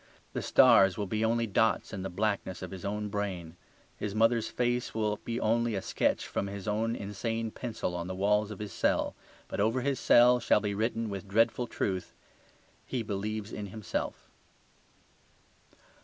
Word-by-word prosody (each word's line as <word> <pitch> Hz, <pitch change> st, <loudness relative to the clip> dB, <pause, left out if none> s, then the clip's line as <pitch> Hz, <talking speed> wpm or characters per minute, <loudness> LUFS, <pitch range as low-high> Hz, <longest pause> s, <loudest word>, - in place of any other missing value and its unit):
The -, -, -2 dB
stars 95 Hz, -2 st, +6 dB
will 105 Hz, -, -1 dB
be 110 Hz, +3 st, -1 dB
only 115 Hz, +1 st, +2 dB
dots 110 Hz, +1 st, +1 dB
in 95 Hz, -, -4 dB
the 95 Hz, -, -3 dB
blackness 95 Hz, -1 st, -2 dB
of 90 Hz, -, -6 dB
his 95 Hz, -2 st, -8 dB
own 105 Hz, +1 st, -2 dB
brain; 95 Hz, -5 st, -4 dB, 0.4 s
his 105 Hz, -1 st, -4 dB
mother's 115 Hz, 0 st, +3 dB
face 120 Hz, -1 st, -1 dB
will 105 Hz, -1 st, 0 dB
be 115 Hz, +2 st, -4 dB
only 115 Hz, 0 st, +1 dB
a 95 Hz, -, -1 dB
sketch -, -, 0 dB
from 100 Hz, -, -2 dB
his 100 Hz, 0 st, -7 dB
own 110 Hz, +2 st, 0 dB
insane 110 Hz, +3 st, -3 dB
pencil 115 Hz, -7 st, -4 dB
on 85 Hz, 0 st, -3 dB
the 95 Hz, -, -4 dB
walls 105 Hz, +2 st, +2 dB
of 105 Hz, -, -7 dB
his 105 Hz, 0 st, -6 dB
cell. -, -, +1 dB, 0.3 s
But -, -, -5 dB
over 115 Hz, +5 st, +2 dB
his 140 Hz, 0 st, 0 dB
cell 125 Hz, +1 st, +6 dB
shall 115 Hz, -, +3 dB
be 105 Hz, -1 st, -2 dB
written, 115 Hz, +2 st, -1 dB
with 100 Hz, 0 st, -6 dB
dreadful 115 Hz, +4 st, +2 dB
truth, 95 Hz, -5 st, -3 dB, 0.7 s
"He 125 Hz, -3 st, -3 dB
believes 105 Hz, +1 st, -3 dB
in 105 Hz, -1 st, -5 dB
himself." 105 Hz, +1 st, -4 dB
105 Hz, 170 wpm, -30 LUFS, 100-115 Hz, 0.7 s, stars